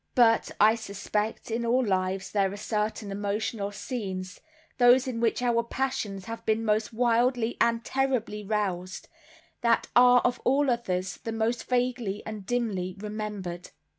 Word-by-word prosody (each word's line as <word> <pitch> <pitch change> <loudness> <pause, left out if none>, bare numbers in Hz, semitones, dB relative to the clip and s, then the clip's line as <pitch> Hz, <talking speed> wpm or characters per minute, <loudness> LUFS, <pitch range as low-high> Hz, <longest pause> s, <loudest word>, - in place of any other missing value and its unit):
But, 230 -2 +4
I 215 +1 +7
suspect, 210 0 -3
in 235 +1 -1
all 245 +2 +2
lives 190 -1 -1
there 195 -2 +1
are 200 - -6
certain 210 -1 -2
emotional 205 +1 -2
scenes, 190 -4 -5 0.4
those 245 +2 +6
in 240 -3 -3
which 235 +1 +1
our 235 -1 +3
passions 230 -6 -3
have 230 +1 -7
been 220 0 0
most 215 0 +1
wildly 240 0 +2
and 230 0 +2
terribly 255 -6 -1
roused, 190 -3 -2 0.5
that 235 -1 +2
are 245 0 +7
of 245 - 0
all 275 +1 +3
others 185 -6 -2
the 225 - -6
most 225 +2 -1
vaguely 245 -5 -1
and 210 -3 -7
dimly 200 -7 -1
remembered. 210 -4 -5
220 Hz, 145 wpm, -27 LUFS, 200-240 Hz, 0.5 s, I